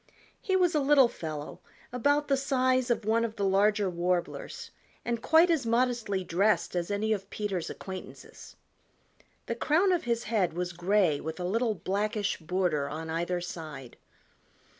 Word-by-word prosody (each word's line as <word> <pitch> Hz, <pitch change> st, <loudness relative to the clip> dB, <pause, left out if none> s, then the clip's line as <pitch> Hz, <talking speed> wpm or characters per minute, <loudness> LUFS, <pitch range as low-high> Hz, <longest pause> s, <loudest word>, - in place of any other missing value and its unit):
He 380 Hz, -4 st, 0 dB
was 360 Hz, -2 st, +3 dB
a 305 Hz, -, +3 dB
little 275 Hz, -2 st, +5 dB
fellow 155 Hz, -9 st, -7 dB, 0.3 s
about 285 Hz, +4 st, +2 dB
the 275 Hz, -, +3 dB
size 255 Hz, -2 st, +1 dB
of 235 Hz, -3 st, 0 dB
one 225 Hz, +2 st, +2 dB
of 225 Hz, -1 st, -3 dB
the 200 Hz, -, -1 dB
larger 200 Hz, +1 st, +3 dB
Warblers 180 Hz, -, -3 dB, 0.3 s
and 235 Hz, -1 st, -2 dB
quite 325 Hz, +5 st, +5 dB
as 315 Hz, -5 st, +1 dB
modestly 230 Hz, -4 st, 0 dB
dressed 195 Hz, +3 st, +1 dB
as 175 Hz, +1 st, -1 dB
any 210 Hz, +2 st, 0 dB
of 195 Hz, -1 st, -5 dB
Peter's 195 Hz, -5 st, -3 dB
acquaintances. 190 Hz, -1 st, -9 dB, 0.9 s
The -, -, -2 dB
crown 350 Hz, +6 st, +2 dB
of 355 Hz, -6 st, 0 dB
his 235 Hz, 0 st, 0 dB
head 210 Hz, -7 st, 0 dB
was 175 Hz, +1 st, -3 dB
gray 175 Hz, -3 st, +2 dB
with 160 Hz, +2 st, -6 dB
a -, -, -3 dB
little 225 Hz, +4 st, 0 dB
blackish 205 Hz, +2 st, -1 dB
border 165 Hz, -4 st, -1 dB
on 160 Hz, +2 st, -5 dB
either 175 Hz, +2 st, -1 dB
side. 155 Hz, -8 st, -8 dB
205 Hz, 160 wpm, -29 LUFS, 180-245 Hz, 0.9 s, little